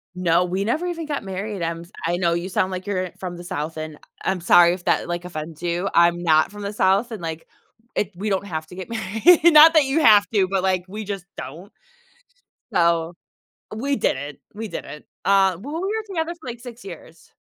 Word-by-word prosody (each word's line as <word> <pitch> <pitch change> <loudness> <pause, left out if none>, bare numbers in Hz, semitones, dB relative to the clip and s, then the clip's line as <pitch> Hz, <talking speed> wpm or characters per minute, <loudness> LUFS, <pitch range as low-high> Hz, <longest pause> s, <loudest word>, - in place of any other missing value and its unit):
No, 175 -1 +2
we 185 +2 -2
never 310 +11 0
even 335 -2 -4
got 290 -5 -3
married, 195 +1 -5
I'm 165 0 -3 0.2
I 175 +1 0
know 170 -2 +1
you 175 +3 -3
sound 185 0 0
like 185 +1 -5
you're 185 -3 -2
from 180 -2 -6
the 175 - -10
South, 155 -1 -4
and 155 -1 -6
I 170 - -5
I'm 185 -2 -3
sorry 175 0 +6
if 180 -1 -8
that, - - +1
like, 175 0 -4
offends 160 -1 -7
you, 175 +2 -1
I'm 170 0 +4
not 155 -1 +3
from 205 0 -9
the 200 +1 -4
South 200 +4 +2
and, 215 -5 -6
like, 160 0 -5 0.5
it 205 -1 -1
we 205 +4 -3
don't 195 0 -1
have 155 -4 -5
to 180 - -12
get 185 +3 -8
married, 225 - +3
not 320 -1 +9
that 310 -4 +5
you 275 +4 +1
have 210 -6 +7
to, 195 -3 +3
but 195 -1 0
like 185 -1 +1
we 215 +3 -6
just 195 -3 -5
don't. 170 +9 -9 1.0
So, 170 -1 +2 0.6
we 275 +5 -1
didn't, 145 - -2 0.2
we 220 +2 -5
didn't, 150 -5 -8 0.2
uh, 195 -3 +4
well, 290 +7 -7
we 365 +4 -2
were 440 +1 -2
together 340 -4 -3
for, 260 - -9
like, 240 0 -6
6 245 -1 -10
years. 170 -3 -12
190 Hz, 215 wpm, -22 LUFS, 170-220 Hz, 1.0 s, not